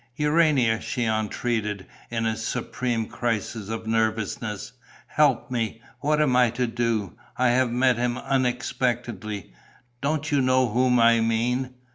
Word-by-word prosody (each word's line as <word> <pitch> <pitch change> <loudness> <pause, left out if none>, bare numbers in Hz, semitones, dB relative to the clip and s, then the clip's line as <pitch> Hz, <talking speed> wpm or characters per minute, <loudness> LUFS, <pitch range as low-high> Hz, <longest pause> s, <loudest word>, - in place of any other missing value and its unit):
"Urania," 150 -7 +3
she 125 -3 -2
entreated, 110 -2 -1 0.2
in 115 -1 -2
a 110 0 0
supreme 115 +1 -2
crisis 110 -2 -3
of 110 0 -4
nervousness, 110 -1 -1 0.3
"help 140 -6 +2
me! 115 -2 -2 0.2
What 150 +1 +1
am 145 -5 +3
I 125 -1 +5
to 120 +2 -1
do? 115 -4 -1 0.2
I 125 0 +3
have 125 +1 +3
met 125 0 +2
him 120 0 0
unexpectedly. 120 - -2 0.5
Don't 150 +1 -1
you 140 -2 +3
know 130 -1 +3
whom 125 +2 +3
I 115 0 +5
mean? 125 +3 0
120 Hz, 135 wpm, -25 LUFS, 110-130 Hz, 0.5 s, I